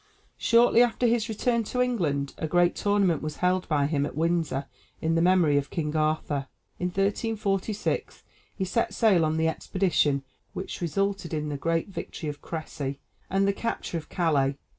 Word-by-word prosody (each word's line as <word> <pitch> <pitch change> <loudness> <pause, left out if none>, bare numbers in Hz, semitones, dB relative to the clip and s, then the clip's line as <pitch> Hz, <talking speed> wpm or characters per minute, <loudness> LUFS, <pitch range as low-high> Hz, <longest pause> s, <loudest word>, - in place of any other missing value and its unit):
Shortly 235 0 +5
after 245 0 +2
his 235 -1 +2
return 235 +2 +1
to 250 - -3
England 165 - 0
a 160 - -1
great 175 +2 +3
tournament 200 -6 +2
was 155 -1 -4
held 180 0 0
by 145 -3 +2
him 145 -1 0
at 145 - -4
Windsor 165 -4 0 0.3
in 160 +1 0
memory 165 -3 +4
of 140 - -6
King 150 -2 -3
Arthur. 155 -3 0 0.3
In 180 - 0
1346 200 +1 -1 0.3
he 190 - -1
set 230 +5 -1
sail 205 -8 +4
on 155 0 +1
the 160 0 +2
expedition 160 -5 +1 0.3
which 190 - -6
resulted 190 +1 -1
in 150 0 -2
the 145 - -3
great 165 +5 -1
victory 165 -4 -5
of 145 -1 -7
Crécy 145 -4 -5 0.3
and 195 +1 +2
the 200 - +2
capture 200 -5 -3
of 155 - -14
Calais. 140 -5 +1
170 Hz, 165 wpm, -27 LUFS, 150-200 Hz, 0.3 s, Shortly